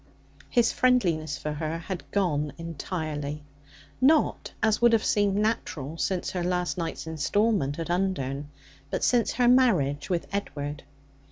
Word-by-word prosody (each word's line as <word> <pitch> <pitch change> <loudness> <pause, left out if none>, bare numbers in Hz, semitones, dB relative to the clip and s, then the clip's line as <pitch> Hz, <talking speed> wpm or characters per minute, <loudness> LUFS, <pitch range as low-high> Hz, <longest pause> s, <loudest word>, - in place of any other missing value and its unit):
His 240 -1 +3
friendliness 170 - +2
for 150 - -4
her 155 +2 -3
had 175 +2 -5
entirely 150 -7 0
gone, 155 -3 -4 0.6
not, 300 +4 +3
as 220 0 +2
would 235 -1 +6
have 225 - +3
seemed 205 -2 +2
natural, 205 - -1
since 185 -3 -1
her 180 -2 -2
last 180 0 0
night's 165 -3 -4
instalment 160 0 +1
at 165 0 -3
Undern, 145 -7 -1 0.4
but - - -2
since 235 -4 +3
her 245 0 +2
marriage 190 - +3
with 175 -2 0
Edward. 145 -7 -3
175 Hz, 140 wpm, -27 LUFS, 150-210 Hz, 0.6 s, would